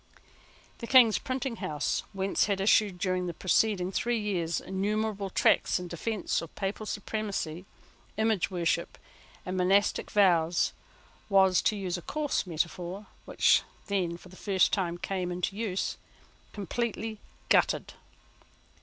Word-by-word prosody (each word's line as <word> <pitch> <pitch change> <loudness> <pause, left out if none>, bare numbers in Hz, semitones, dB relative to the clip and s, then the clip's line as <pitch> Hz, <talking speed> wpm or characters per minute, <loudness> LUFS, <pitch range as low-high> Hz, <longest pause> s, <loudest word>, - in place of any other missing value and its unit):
The 235 - -6
King's 240 -4 +6
printing 255 -2 -3
house, 150 -7 -1
whence 195 0 +1
had 200 -2 -1
issued, 200 -1 +3
during 185 0 -1
the 170 - -5
preceding 190 -1 +1
three 240 +4 0
years, 175 -6 -1
innumerable 205 +1 -2
tracts - - +3
in 180 - -5
defence 200 +5 -2
of 165 - -10
Papal 205 +2 -3
supremacy, 200 -5 -3 0.5
image 220 -4 +1
worship, 170 -2 -1 0.5
and 185 - -3
monastic 195 +3 +2
vows, 175 -4 +3 0.6
was, 190 -2 +5
to 215 - +1
use 185 -3 -3
a - - -11
coarse 295 - -2
metaphor 175 +4 -3 0.2
which - - +4 0.2
then, 180 -4 -1
for 180 - -15
the 185 - -14
first 190 -1 +2
time, 175 -4 0
came 180 0 -3
into 180 +2 -2
use, 205 -4 -2 0.5
completely 220 +1 -3 0.3
gutted. - - +2
195 Hz, 130 wpm, -29 LUFS, 180-215 Hz, 0.6 s, King's